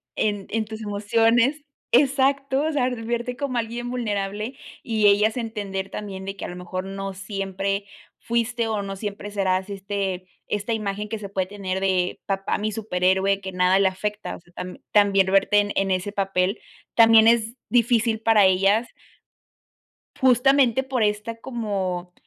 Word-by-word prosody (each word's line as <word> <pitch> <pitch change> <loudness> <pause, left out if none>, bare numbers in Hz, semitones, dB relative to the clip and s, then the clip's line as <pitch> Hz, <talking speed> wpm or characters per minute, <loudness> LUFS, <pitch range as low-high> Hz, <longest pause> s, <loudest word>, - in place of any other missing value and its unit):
en 205 -2 -1
en 220 0 0
tus 220 +1 -8
emociones 230 +7 +2 0.3
exacto. 275 +1 +3
O 315 - 0
sea, 275 -4 +1
el 245 -3 -4
verte 240 +1 -2
como 275 -3 -3
alguien 235 +1 -3
vulnerable 210 0 -3 0.3
y 220 -3 +2
ellas 210 +2 +4
entender 205 -5 -4
también 195 -2 -6
de 195 +1 -6
que - - -5
a - - -4
lo 180 - -7
mejor 185 +1 -5
no 195 0 -5
siempre 195 0 -3 0.4
fuiste 235 0 -1
o 215 -2 -1
no 195 0 -5
siempre 205 0 -6
serás, 190 -1 0
este, 195 -2 -3 0.2
esta 210 +2 -2
imagen 210 -1 -3
que 220 - -4
se 205 -2 -8
puede 190 -2 -1
tener 190 -1 -4
de 185 -2 0
papá, 195 -1 -1
mi 215 0 -2
superhéroe, 190 -1 +1
que 190 -1 -7
nada 180 +1 +3
le 195 - +4
afecta, 210 +3 -3
o - - -12
sea, 175 - -25
tam 180 0 -7
también 200 -2 +4
verte 195 +2 +4
en 205 0 0
en 195 -1 +1
ese 185 +2 -1
papel, 195 -1 0 0.3
también 225 -1 +7
es 230 -1 +3 0.2
difícil 230 -2 +2
para 220 -3 +5
ellas 195 +5 +3 1.3
justamente 260 0 +4
por 260 -3 -1
esta 210 +2 -1
como 195 -7 -3
205 Hz, 165 wpm, -24 LUFS, 195-230 Hz, 1.3 s, también